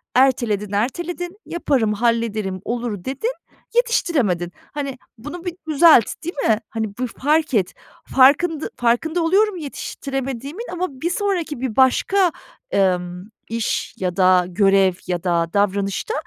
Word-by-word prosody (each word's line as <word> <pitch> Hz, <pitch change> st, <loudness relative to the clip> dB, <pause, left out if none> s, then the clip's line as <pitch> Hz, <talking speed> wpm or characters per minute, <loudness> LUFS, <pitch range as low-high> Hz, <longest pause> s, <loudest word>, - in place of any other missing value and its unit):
erteledin, 235 Hz, -6 st, +2 dB
erteledin. 345 Hz, -, -3 dB
Yaparım, 270 Hz, -10 st, 0 dB
hallederim, 220 Hz, -4 st, 0 dB
olur, 235 Hz, -5 st, -3 dB
dedin; 275 Hz, -, -2 dB, 0.4 s
yetiştiremedin." 275 Hz, -, +1 dB, 0.2 s
Hani, 280 Hz, -3 st, -4 dB, 0.2 s
bunu 295 Hz, +10 st, -8 dB
bir 355 Hz, -, -2 dB, 0.2 s
düzelt, 310 Hz, -6 st, +7 dB, 0.2 s
değil 345 Hz, +2 st, -4 dB
mi? 220 Hz, -1 st, +3 dB
Hani, 220 Hz, -3 st, -4 dB
bir 255 Hz, 0 st, -1 dB
fark 300 Hz, +5 st, 0 dB
et. 200 Hz, -6 st, +1 dB, 0.4 s
Farkında 290 Hz, +4 st, +4 dB
farkında 315 Hz, +9 st, +1 dB
oluyorum 390 Hz, +4 st, +3 dB
yetiştiremediğimin 275 Hz, -, -5 dB
ama 365 Hz, +1 st, -1 dB
bir 340 Hz, -, 0 dB
sonraki, 350 Hz, -, -1 dB
bir 255 Hz, -5 st, -2 dB
başka, 350 Hz, +8 st, +3 dB, 0.4 s
emm, 180 Hz, -2 st, 0 dB, 0.3 s
iş 230 Hz, -1 st, -2 dB
ya 180 Hz, -2 st, -2 dB
da 185 Hz, -1 st, +5 dB
görev 195 Hz, 0 st, +4 dB
ya 175 Hz, -2 st, -2 dB
da 170 Hz, -2 st, +1 dB
davranışta 200 Hz, -, 0 dB
250 Hz, 125 wpm, -21 LUFS, 200-325 Hz, 0.4 s, düzelt